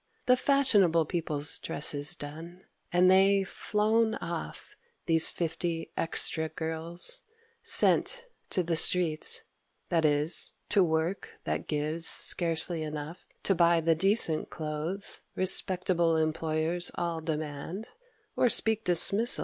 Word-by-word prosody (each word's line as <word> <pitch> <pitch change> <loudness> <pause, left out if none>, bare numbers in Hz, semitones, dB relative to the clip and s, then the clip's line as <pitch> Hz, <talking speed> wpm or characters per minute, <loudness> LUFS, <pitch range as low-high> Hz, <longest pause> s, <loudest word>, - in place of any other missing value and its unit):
The 250 - +4
fashionable 210 - +2
people's 150 -3 +1
dresses 145 0 -1
done, 165 +5 -11 0.3
And 180 +1 +3
they 195 +1 +3
flown 220 +3 -1
off, 170 -1 -8 0.3
these 160 -1 +4
fifty 165 0 -5
extra 160 -1 +1
girls 165 - -2 0.4
Sent—to 485 - +1
the 165 0 -2
streets: 160 -2 +2 0.5
that 165 -2 0
is, 150 +2 +1 0.2
to 205 -2 +2
work 165 +3 -4
that - - -5
gives 155 +2 -4
Scarcely 165 -1 +2
enough 155 +2 -8 0.2
to 195 - +1
buy 170 -1 +2
the 165 0 +1
decent 185 -1 0
clothes 160 +5 -3
Respectable 180 -3 +3
employers 160 +2 -1
all 170 -2 -4
demand 155 +5 -6 0.5
Or 250 - +1
speak 220 -1 +4
dismissal. 200 +6 +3
170 Hz, 110 wpm, -27 LUFS, 160-190 Hz, 0.5 s, The